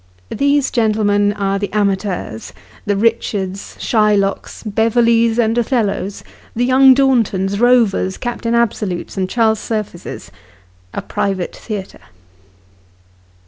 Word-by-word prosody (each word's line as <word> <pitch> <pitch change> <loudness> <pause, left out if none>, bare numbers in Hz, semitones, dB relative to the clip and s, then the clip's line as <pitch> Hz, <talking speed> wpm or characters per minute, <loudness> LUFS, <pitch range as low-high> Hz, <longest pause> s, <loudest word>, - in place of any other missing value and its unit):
These 280 +2 +1
gentlemen 210 -3 +2
are 195 -1 -1
the 205 - -3
amateurs 195 - -2 0.3
the 205 -1 +1
Richards, 200 -3 -1
Shylocks, 210 -3 0
Beverleys, 230 +1 +2
and 225 -1 +2
Othcllos 215 -5 -1 0.3
the 240 +2 +1
Young 260 +1 +6
Dornlons, 215 -8 +1
Rovers, 230 -6 +2
Captain 235 -1 -2
Absolutes, 210 -6 -1
and 185 -1 -2
Charles 220 -1 +2
Surfaces 215 -7 -5 0.6
of - - -5
a - - -25
private 190 -3 -2
theatre. 205 -4 -7
215 Hz, 105 wpm, -17 LUFS, 195-235 Hz, 0.6 s, Young